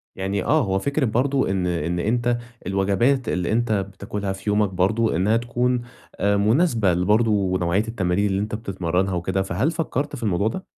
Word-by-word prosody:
يعني 95 0 -2
آه، 155 0 +3
هو 95 -2 0
فكرة 140 +5 0
برضه 130 +2 +1
إن 95 -2 0
إن 85 0 -1
أنت 120 +4 +1 0.3
الوجبات 100 +7 +1
اللي 90 -1 -1
أنت 115 +1 +1
بتاكلها 100 0 -3
في 95 +2 -5
يومك 105 0 +2
برضه، 100 +4 +1
إنها 105 +7 +2
تكون 120 +1 0 0.4
مناسبة 105 - +3
لبرضه 100 0 +2
نوعية 90 +6 0
التمارين 95 -3 0
اللي 95 -1 0
أنت 105 +1 -3
بتتمرنها 95 -3 -1
وكده، 90 +2 -1
فهل 95 - 0
فكرت 150 -3 -2
في 120 - -8
الموضوع 100 -1 +1
ده؟ 185 +11 -4
100 Hz, 165 wpm, -23 LUFS, 95-120 Hz, 0.4 s, آه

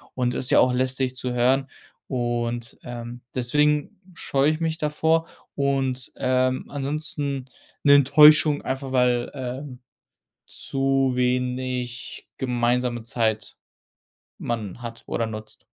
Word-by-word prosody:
und 125 -1 0
ist 130 - +1
ja - - +4
auch 125 0 +4
lästig 130 0 0
zu 125 -1 -3
hören. 130 +3 +2 0.4
Und, 120 -2 -2
ähm, 120 0 -7
deswegen 150 +6 +1
scheue 140 -2 +1
ich 155 - -3
mich 160 -1 -1
davor 160 +1 +1 0.3
und, 135 -2 0
ähm, 130 0 +1
ansonsten 140 -1 -2 0.4
'ne 145 -1 +7
Enttäuschung 150 +2 +6
einfach, 135 0 -4
weil, 125 -2 +2
ähm, 130 0 -6 0.7
zu 135 -1 0
wenig 125 -1 -2
gemeinsame 120 -1 0
Zeit 110 -2 -1 0.8
man 115 -2 -4
hat 115 -1 -8
oder 115 - -1
nutzt. 110 0 -9
130 Hz, 115 wpm, -24 LUFS, 120-140 Hz, 0.8 s, ne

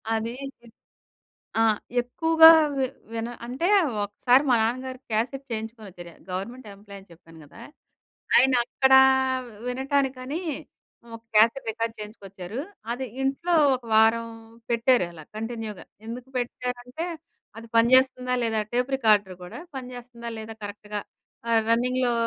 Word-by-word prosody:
అది. 225 +1 -3 0.3
చి 240 - -19 0.9
ఆ! - - +5 0.4
ఎక్కువగా 320 +6 +6 0.3
వి 265 - +2 0.3
విన 230 +1 -3 0.2
అంటే, 260 +8 -2 0.4
ఒకసారి 245 +6 +3
మా 245 - +5
నాన్నగారు 255 +3 -2
క్యాసెట్ 245 +5 -1
చేయించుకొనొచ్చారు. 215 -6 -7 0.2
గవర్నమెంట్ 220 +7 -6
ఎంప్లాయీ 200 0 -12
అని 190 - -22
చెప్పాను 165 -1 -17
గదా! 185 +10 -15 0.8
ఆయన 260 +1 +5
అక్కడ 265 +2 +3 0.7
వినటానికని, 265 +2 -1 0.7
ఒక 230 - -9 0.2
క్యాసెట్ 230 +3 +4
రికార్డ్ 230 +1 -3
చేయించుకొచ్చారు. 200 +1 -8 0.3
అది 260 +2 -4 0.2
ఇంట్లో 275 +6 0 0.2
ఒక 250 - -17
వారం 225 +1 +4 0.4
పెట్టారలా 230 -9 +1
కంటిన్యూగా. 225 -2 -6 0.2
ఎందుకు 240 +3 -7
పెట్టారంటే, 250 +5 -4 0.5
అది 230 0 -11
పనిజేస్తుందా? 255 +1 +4
లేదా? 225 -1 0
టేప్ 250 +2 0
రికార్డర్ 210 -7 +2
గూడా, 180 +10 -9 0.2
పనిజేస్తుందా? 245 -2 -8
లేదా? 220 0 -7
కరెక్ట్‌‌గా. 205 0 -6 0.5
ఆహ్, 225 -1 +3
రన్నింగ్‌‌‌‌లో 250 +1 +2
235 Hz, 115 wpm, -25 LUFS, 220-255 Hz, 0.9 s, ఎక్కువగా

